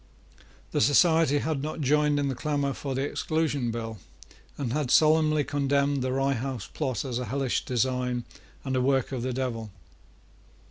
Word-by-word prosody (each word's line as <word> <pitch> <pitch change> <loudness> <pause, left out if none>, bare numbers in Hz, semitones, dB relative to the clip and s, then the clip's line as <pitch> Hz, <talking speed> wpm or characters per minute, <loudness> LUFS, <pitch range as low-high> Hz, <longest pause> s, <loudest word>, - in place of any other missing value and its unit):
The - - +1
society 160 +3 +4
had 155 -1 -1
not 155 +2 -4
joined 150 +1 +2
in 145 -1 0
the 135 - -1
clamour 140 +1 -1
for 135 -1 -4
the 135 - 0
Exclusion 145 -4 -1
Bill, 115 -2 -5 0.6
and 125 -5 -2
had 145 -3 -1
solemnly 155 0 +4
condemned 140 -1 +1
the 130 0 -1
Rye 135 +1 +1
House 130 -3 -4
plot 130 -7 -3
as 125 -2 -2
a 125 - -3
hellish 135 -1 -1
design 125 0 0 0.4
and 130 -1 -1
a 130 - +2
work 135 0 +1
of 130 -3 -3
the 130 +2 -2
devil. 120 -4 -3
135 Hz, 170 wpm, -27 LUFS, 125-145 Hz, 0.6 s, society